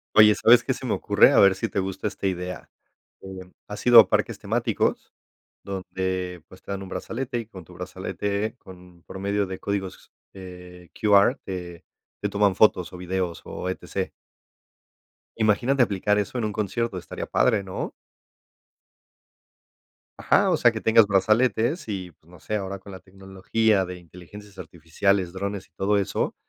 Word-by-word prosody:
Oye, 105 -1 +7
¿sabes 120 +1 +5
qué - - -1
se - - -8
me - - 0
ocurre? - - +4
A - - +4
ver 100 -1 +6
si 95 - -2
te - - -2
gusta 95 +1 -4
esta 100 -1 -3
idea. 90 -1 -5 0.5
Em, 95 -1 -10 0.2
¿has 105 0 -7
ido 120 -1 +10
a - - +7
parques - - 0
temáticos - - -1 0.5
donde, 95 -2 -4
pues, 95 - -16
te - - -18
dan 100 0 -4
un 95 - -10
brazalete 120 +3 -4
y 115 - -7
con 95 -5 -11
tu - - -16
brazalete 105 +2 -4
con 90 -2 -15
promedio 100 +1 -2
de 95 - -6
códigos, 100 -2 -5 0.2
eh, 90 -2 -12
QR, 105 +4 +4
eh, 90 -2 -6 0.4
te 105 - -1
toman 100 -1 +2
fotos 90 -5 +3
o 90 - -8
videos 90 -1 -3
o - - -6
E-T-C? 95 - -4 1.3
Imagínate 120 +5 +2
aplicar 105 -2 +1
eso 105 +5 -3
en 115 - -1
un 105 - -3
concierto, 105 0 -2
estaría - - -7
padre, 110 -5 +1
¿no? 95 0 -5 2.3
Ajá, 195 -2 +3
o 170 - +2
sea, 120 -5 +4
que 110 - -5
tengas 110 -1 +5
brazaletes 110 - +1
y, 95 -4 -5
pues, 80 +2 -28
no 90 -1 -15
sé, 105 - -4
ahora 100 -1 -4
con 100 +1 -13
la 95 - -9
tecnología 95 +2 -1
de 90 0 -6
inteligencias 95 +3 -14
artificiales, 85 +3 -1
drones 100 0 -4
y - - -44
todo 100 +1 +1
eso, 100 - -1
95 Hz, 165 wpm, -24 LUFS, 90-105 Hz, 2.3 s, ido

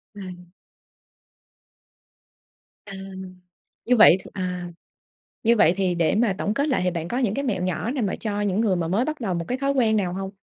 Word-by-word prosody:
À. 180 -3 -9 2.4
À. 195 - -10 0.9
Như 250 0 +3
vậy 210 -4 +8
thì - - -12
à, 180 -2 -4 0.8
như 235 +1 +4
vậy 175 -5 +4
thì 185 -2 0
để 170 +3 +1
mà 215 -4 +2
tổng 210 - -1
kết 285 +3 0
lại 255 -9 +1
thì 180 - +1
bạn 170 -1 -4
có 245 - -3
những 235 -6 +1
cái 280 +4 -2
mẹo 210 -9 -1
nhỏ 185 +6 -2
nào 265 -5 -2
mà 195 - -1
cho 205 -2 -3
những 205 +1 0
người 205 -5 +2
mà 170 -2 -1
mới 210 +9 +1
bắt 310 -1 -4
đầu 195 -5 -1
một 170 -1 -3
cái 250 - -2
thói 275 +1 0
quen 230 -5 +2
nào 180 -3 -1
hông? 195 0 -5
200 Hz, 205 wpm, -24 LUFS, 180-235 Hz, 2.4 s, vậy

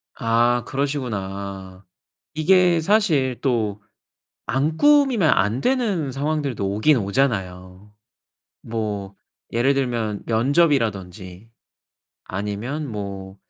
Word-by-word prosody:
아 120 +1 +2
그러시구나. 100 -9 -4 0.5
이게 175 +2 +4
사실 155 - +2
또 110 -6 -1 0.7
안 150 +5 0
꾸미면 275 - +4
안 105 +2 +2
되는 205 - 0
상황들도 140 -7 -2
오긴 120 +8 +3
오잖아요. 100 -4 -2 0.7
뭐 105 -3 -4 0.4
예를 120 +4 +2
들면 120 -6 -2
면접이라든지 110 - 0 0.8
아니면 105 +10 -4
뭐 100 -3 -6
120 Hz, 190 characters per minute, -22 LUFS, 100-145 Hz, 0.8 s, 이게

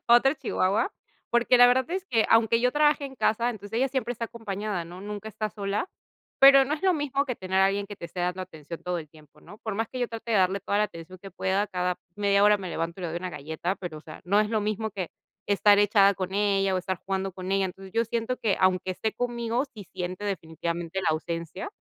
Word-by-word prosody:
otra 240 +4 +6
chihuahua, 225 - 0 0.4
porque, 240 +1 +4
la 245 - +9
verdad 255 +3 +2
es 375 +1 -2
que, 225 -8 +2
aunque 225 0 +4
yo 250 0 +2
trabaje 295 -1 +3
en 265 -1 -8
casa, 230 +1 +1
entonces, 205 -2 -9
ella 265 - +2
siempre 250 -3 -2
está 230 -1 -4
acompañada, 205 -5 -4
¿no? 175 +2 -10
Nunca 210 +2 -6
está 215 +1 -3
sola, 200 - -2 0.5
pero, 275 0 +9
no 290 +3 -1
es 310 - -9
lo 375 -1 +4
mismo 285 -2 0
que 255 - -3
tener 190 0 -1
a 195 - +6
alguien, 200 +1 -1
que 205 -1 -9
te - - -9
esté 170 +2 -6
dando 180 +1 -1
atención 165 -2 -9
todo 180 -1 -2
el 155 -2 -8
tiempo, 155 0 -20
¿no? 210 - -14
Por 215 -2 -4
más 225 +1 -1
que 255 - -7
yo 245 -1 0
trate, 230 0 -5
de - - +4
darle 190 +1 +2
toda 205 - 0
la 210 - +4
atención 185 -2 -9
que 195 - -10
pueda, 190 +2 0
cada 180 -2 -1 0.2
media 200 -1 +3
hora 210 0 +5
me 190 -2 -6
levanto, 165 +2 -3
y - - -6
le 175 - -2
doy 165 - -4
una 185 +1 -5
galleta, 160 +4 -3
pero, 170 -4 -6
o - - -12
sea, 155 0 -11
no 200 +3 +3
es 215 0 0
lo 220 -2 +1
mismo, 215 +1 -2
que 190 -4 -4 0.4
estar 205 0 +5
echada 200 -1 +5
con 185 0 -4
ella, 195 -1 +2
o - - +1
estar 185 0 -3
jugando 195 0 -2
con 185 +1 -6
ella. 195 0 +2
Entonces 190 +1 -7
yo 230 - +2
siento 235 +2 -2
que, 210 -5 0
aunque 185 0 +2
esté 220 +4 -2
conmigo, 240 0 -1
sí 210 -2 -9
siente 185 +2 -4
definitivamente 170 -1 -3
la 175 - +1
ausencia. 165 - -4
200 Hz, 245 wpm, -27 LUFS, 185-230 Hz, 0.5 s, la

